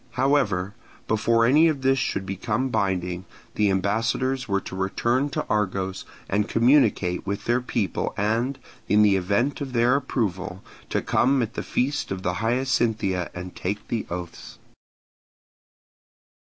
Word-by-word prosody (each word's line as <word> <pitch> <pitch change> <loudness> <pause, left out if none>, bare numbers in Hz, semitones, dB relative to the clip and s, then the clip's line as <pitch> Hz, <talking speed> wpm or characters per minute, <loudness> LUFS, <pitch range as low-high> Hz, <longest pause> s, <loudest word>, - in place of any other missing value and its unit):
However, 125 -9 +1 0.3
before 115 +1 +3
any 150 +7 +5
of 145 -4 -1
this 135 0 +3
should 95 -5 -1
become 105 +7 -2
binding, 90 -4 -1 0.3
the 105 -1 +2
ambassadors 115 +7 0
were 100 -2 +1
to - - -8
return 120 +8 0
to - - -3
Argos 95 -2 -1 0.2
and 105 +2 0
communicate 115 -8 +3
with 100 +1 -3
their 120 +2 +2
people 110 -6 -2
and, 115 +6 0 0.3
in 105 +1 +5
the 100 -2 +5
event 100 +11 0
of 135 -2 -4
their 120 +2 +3
approval, 95 -9 -2 0.3
to - - -1
come 130 0 +2
at 115 0 -5
the - - -3
feast 140 +3 -1
of 95 -1 -4
the 90 - 0
Hyacinthia 115 -6 0
and 90 0 -7
take 100 +3 -4
the 115 - -2
oaths. 85 -1 -7
110 Hz, 140 wpm, -24 LUFS, 95-125 Hz, 0.3 s, any